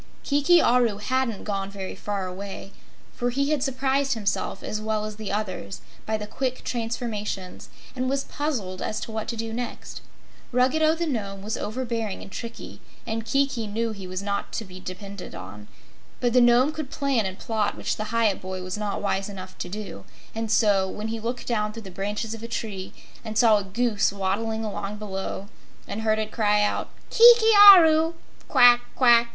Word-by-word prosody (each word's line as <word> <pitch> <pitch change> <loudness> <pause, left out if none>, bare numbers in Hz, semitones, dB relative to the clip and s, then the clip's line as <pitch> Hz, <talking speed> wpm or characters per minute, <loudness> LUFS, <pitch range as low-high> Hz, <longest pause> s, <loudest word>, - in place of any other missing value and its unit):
Kiki 290 +5 +4
Aru 240 -6 +3
hadn't 245 0 -1
gone 195 -2 -3
very 195 -1 -6
far 200 -2 -4
away, 195 +1 -7 0.4
for 245 - -1
he 280 +4 0
had 300 -3 +1
surprised 270 +1 +1
himself 205 -3 -2
as 215 - -3
well 215 0 -1
as 215 -1 -7
the 215 -2 -5
others 185 - -4 0.3
by 220 0 0
the 210 - -5
quick 255 +4 -3
transformations 225 -5 -4 0.3
and 255 0 -1
was 275 0 0
puzzled 235 -12 -3
as 215 - -2
to - - -6
what 220 -1 -4
to 235 - -3
do 225 0 -4
next. 245 +1 -6 0.5
Ruggedo 310 +6 +3
the 340 +1 -2
Nome 200 -9 -3
was 215 +2 -2
overbearing 230 -3 -3
and 195 - -12
tricky, 230 +2 -8 0.2
and 225 0 -3
Kiki 270 -2 0
knew 225 +2 -2
he 195 -3 -8
was 185 +1 -4
not 200 0 -2
to 225 - -3
be 185 -1 -11
depended 190 +1 -8
on; 100 +3 -9 0.5
but 245 -1 +1
the 250 - +6
Nome 240 +4 +5
could 310 -3 -6
plan 275 -9 0
and 190 0 -7
plot, 215 -2 -1
which - - -2
the 215 - -4
Hyup 220 -2 +1
boy 185 0 -5
was 185 +3 -4
not 210 -1 -3
wise 195 0 -1
enough 185 -2 -9
to 180 - -4
do, 195 - -7 0.3
and 225 0 -3
so, 205 -3 +3
when 210 +3 -5
he 225 0 -3
looked 240 +2 -4
down 210 -3 0
through 225 0 -8
the 190 - -9
branches 205 +4 -3
of 225 - -8
a 230 - -6
tree 205 -5 -5 0.3
and 220 -1 -5
saw 220 -2 +6
a - - -5
Goose 210 +1 +1
waddling 205 +3 -2
along 205 0 -4
below 195 -1 -5 0.4
and 205 +2 -4
heard 220 -1 +2
it 215 0 -3
cry 210 -2 +2
out, 210 - -1 0.2
"Kiki 465 -1 +8 0.2
Aru! 325 -1 +4 0.3
Quack 245 -2 +7
quack! 235 -2 +5
220 Hz, 190 wpm, -25 LUFS, 200-245 Hz, 0.5 s, Kiki